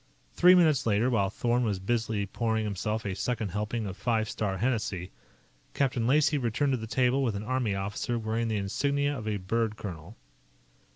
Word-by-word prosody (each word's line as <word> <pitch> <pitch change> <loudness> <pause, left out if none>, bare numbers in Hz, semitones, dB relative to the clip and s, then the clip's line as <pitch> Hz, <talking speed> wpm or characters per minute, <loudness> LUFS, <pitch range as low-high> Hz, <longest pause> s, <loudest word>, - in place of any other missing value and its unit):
Three 180 +1 +7
minutes 155 -9 +4
later, 110 +4 +2
while 100 -5 +2
Thorn 120 +3 0
was 105 -4 0
busily 110 +1 -1
pouring 110 +2 -1
himself 105 +2 -2
a 100 - -1
second 110 +1 -2
helping 105 +4 -2
of 95 -1 -5
Five 110 -1 0
Star 100 -3 -2
Hennessy, 100 -5 -1 0.6
Captain 125 -4 +1
Lacey 150 +2 +3
returned 130 +3 0
to - - +1
the 110 -1 -6
table 130 +3 +2
with 115 -6 0
an 100 - -4
army 120 -3 -1
officer 100 +5 -2
wearing 115 +1 -1
the 110 -1 -1
insignia 140 +8 0
of 110 -5 -6
a 105 -1 0
bird 110 +3 -1
colonel. 90 -1 -8
110 Hz, 180 wpm, -28 LUFS, 105-125 Hz, 0.6 s, Three